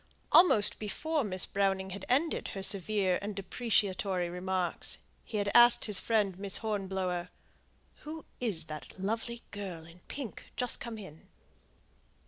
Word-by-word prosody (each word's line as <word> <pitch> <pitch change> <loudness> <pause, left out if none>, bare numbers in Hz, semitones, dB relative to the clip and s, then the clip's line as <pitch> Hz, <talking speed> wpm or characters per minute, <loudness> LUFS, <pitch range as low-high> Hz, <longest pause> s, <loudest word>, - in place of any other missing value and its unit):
Almost 220 - +6
before 300 +8 -1
Miss 185 -4 0
Browning 195 -1 0
had 200 +1 -7
ended 285 +6 +1
her 195 - -4
severe 195 -1 +2
and 205 0 -5
depreciatory 195 -4 0
remarks, 180 0 -1 0.3
he 215 - -5
had 200 0 0
asked 240 0 +7
his 210 -4 +2
friend 205 -5 0
Miss 200 -1 +2
Hornblower, 190 -4 -2 0.7
"Who 315 +1 -8
is 205 -10 +1
that 155 +2 -9
lovely 225 +4 -3
girl 185 -5 -6
in 165 +2 -15
pink, 265 -6 -7
just 250 -1 -1
come 235 -2 -6
in?" 185 -7 -12
200 Hz, 135 wpm, -31 LUFS, 185-225 Hz, 0.7 s, asked